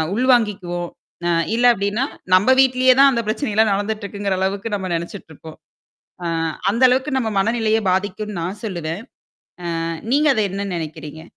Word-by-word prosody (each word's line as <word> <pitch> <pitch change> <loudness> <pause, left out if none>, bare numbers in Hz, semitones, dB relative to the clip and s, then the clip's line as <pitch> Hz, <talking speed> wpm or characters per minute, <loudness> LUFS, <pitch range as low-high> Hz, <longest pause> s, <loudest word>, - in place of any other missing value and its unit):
உள் 250 +3 +1
வாங்கிக்குவோம். 185 -7 -1 0.4
அ - - +1 0.3
இல்ல 240 +1 +2
அப்டின்னா, 205 +4 -1 0.3
நம்ம 185 +5 +3
வீட்லயே 255 -1 +4
தான் 275 0 +7
அந்த 235 -3 0
பிரச்சனைல்லாம் 220 -2 +1
நடந்துட்டு 210 +2 -2
இருக்குங்கிற 200 -1 -2
அளவுக்கு 195 +3 -2
நம்ம 190 -2 -4
நினச்சுட்டுருப்போம். 160 -2 -8 0.7
அ - - -2 0.5
அந்த 230 +4 -2
அளவுக்கு 265 +3 0
நம்ம 235 -4 -1
மனநிலையை 220 +1 +1
பாதிக்கும்ன்னு 205 +1 -3
நான் 190 +5 -5
சொல்லுவேன். 170 -4 -4 0.8
ஆ - - -3 0.3
நீங்க 295 +3 +3
அத 220 - 0
என்ன 200 +1 -4
நினைக்கிறீங்க? 155 -1 -7
205 Hz, 150 wpm, -20 LUFS, 185-230 Hz, 0.8 s, தான்